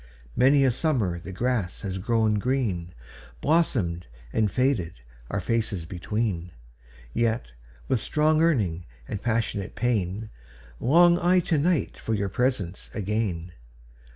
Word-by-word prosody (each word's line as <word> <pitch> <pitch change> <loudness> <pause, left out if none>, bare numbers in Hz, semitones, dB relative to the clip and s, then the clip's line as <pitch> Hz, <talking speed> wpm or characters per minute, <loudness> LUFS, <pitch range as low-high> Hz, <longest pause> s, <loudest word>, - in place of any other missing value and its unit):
Many 135 +2 +5
a 130 - +4
summer 115 - 0
the 95 - -8
grass 110 -2 -1
has 95 -2 -3
grown 110 0 +2
green, 105 -9 -1 0.5
Blossomed 110 - +1 0.3
and 110 -2 +2
faded, 125 -7 +1 0.4
our - - -1
faces 110 -7 -1
between:Yet, 85 - -3 0.3
with 125 -5 +1
strong 155 +1 +2
yearning 105 - +1 0.2
and 105 - -4
passionate 110 -4 -1
pain, 110 -3 -1 0.5
Long 170 +6 +5
I 180 +1 +4
to 160 -2 +1
night 165 0 0
for 110 - -1
your 100 -1 -1
presence 100 -6 -1
again. 100 -5 -2
110 Hz, 120 wpm, -26 LUFS, 90-130 Hz, 0.5 s, Many